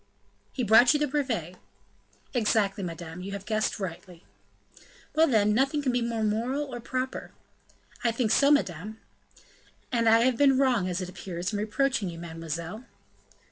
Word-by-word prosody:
"He 255 - -3
brought 235 +6 +6
you - - +2
the 295 - +2
brevet." 245 - -2 0.8
"Exactly, 210 -4 +1
madame; 170 0 -7
you 195 +2 -6
have 200 0 -6
guessed 215 0 -1
rightly." 180 -1 -7 0.9
"Well, 320 +1 +4
then, 210 -4 +3
nothing 275 +5 +1
can 260 - +1
be 245 0 0
more 230 -1 -2
moral 245 +6 -1
or 240 - -4
proper." 255 +2 -4 0.7
"I 240 - +3
think 230 -1 0
so, 280 +4 +5
madame." 215 - 0 0.9
"And 230 -2 +3
I 225 +1 +6
have 250 0 +2
been 275 -1 +4
wrong, 250 -8 +2
as 180 +1 -2
it 180 - -5
appears, 180 +1 -5
in 205 - -1
reproaching 220 -1 0
you, 165 - -8
mademoiselle." 165 +5 -6
220 Hz, 160 wpm, -27 LUFS, 185-255 Hz, 0.9 s, brought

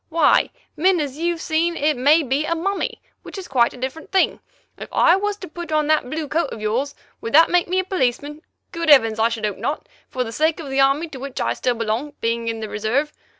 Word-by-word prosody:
Why, 325 -2 +3 0.3
men, 360 +3 +3
as 290 -1 -4
you've 340 0 -1
seen, 330 +2 0
it 300 +1 +1
may 290 +6 +4
be 270 +2 0
a 335 +2 -1
mummy, 390 +4 -3 0.2
which - - -10
is 380 - -7
quite 240 -3 +2
a - - -12
different 260 +6 -6
thing. 385 -1 +2 0.4
If - - -8
I 340 - +5
was 410 +1 -2
to 370 - -9
put 340 0 -8
on 305 -1 +2
that 305 -4 +1
blue 310 +2 -3
coat 310 +1 0
of - - -7
yours, 235 +7 -2 0.3
would 230 - -5
that 325 +3 +6
make 355 0 +3
me 365 +2 -1
a 375 - +2
policeman? 295 -4 -2 0.3
Good 335 -2 -2
heavens! 225 -6 +5
I 225 +1 +3
should 230 -2 -3
hope 205 -2 -3
not, 295 - -3 0.2
for 255 - -2
the 225 - -7
sake 315 +6 +1
of 290 -4 -7
the 270 - 0
Army 275 +5 +2
to 275 -4 -9
which 275 0 -6
I - - 0
still 250 -1 -1
belong, 230 +6 -2
being 230 0 -1
in 225 -1 -3
the 215 - -4
Reserve. 245 +9 -1
295 Hz, 240 wpm, -21 LUFS, 250-330 Hz, 0.4 s, that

